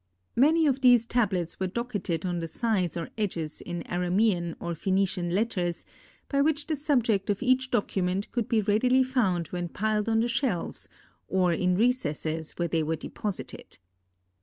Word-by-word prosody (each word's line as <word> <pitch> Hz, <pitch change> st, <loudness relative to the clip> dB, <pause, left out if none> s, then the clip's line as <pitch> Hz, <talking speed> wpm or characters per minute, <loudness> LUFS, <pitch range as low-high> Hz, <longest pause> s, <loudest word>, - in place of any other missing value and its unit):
Many 315 Hz, +6 st, +4 dB
of 270 Hz, -2 st, +1 dB
these 245 Hz, -3 st, +6 dB
tablets 195 Hz, -8 st, 0 dB
were 190 Hz, -, 0 dB
docketed 200 Hz, -6 st, -3 dB
on 175 Hz, -1 st, -1 dB
the 165 Hz, -, -3 dB
sides 185 Hz, -3 st, -1 dB
or 165 Hz, -, -5 dB
edges 170 Hz, -7 st, -3 dB
in 175 Hz, -1 st, -5 dB
Aramean 180 Hz, -1 st, 0 dB
or 170 Hz, 0 st, -3 dB
Phœnician 185 Hz, 0 st, 0 dB
letters, 180 Hz, -4 st, -1 dB, 0.4 s
by 280 Hz, -1 st, +1 dB
which 300 Hz, 0 st, +1 dB
the 315 Hz, -, -1 dB
subject 245 Hz, -10 st, +1 dB
of 205 Hz, +4 st, 0 dB
each 255 Hz, 0 st, +2 dB
document 195 Hz, -4 st, -1 dB
could 235 Hz, -3 st, -2 dB
be 225 Hz, -2 st, +3 dB
readily 250 Hz, +6 st, +3 dB
found 200 Hz, -, 0 dB
when 175 Hz, -1 st, -3 dB
piled 215 Hz, +3 st, 0 dB
on 225 Hz, 0 st, +3 dB
the 235 Hz, -, +1 dB
shelves 235 Hz, -6 st, -1 dB, 0.4 s
or 185 Hz, -2 st, +2 dB
in 180 Hz, +2 st, +1 dB
recesses 160 Hz, -, 0 dB
where 175 Hz, -, -1 dB
they 165 Hz, 0 st, 0 dB
were 160 Hz, +1 st, 0 dB
deposited. 205 Hz, +4 st, -6 dB
200 Hz, 160 wpm, -27 LUFS, 175-240 Hz, 0.4 s, these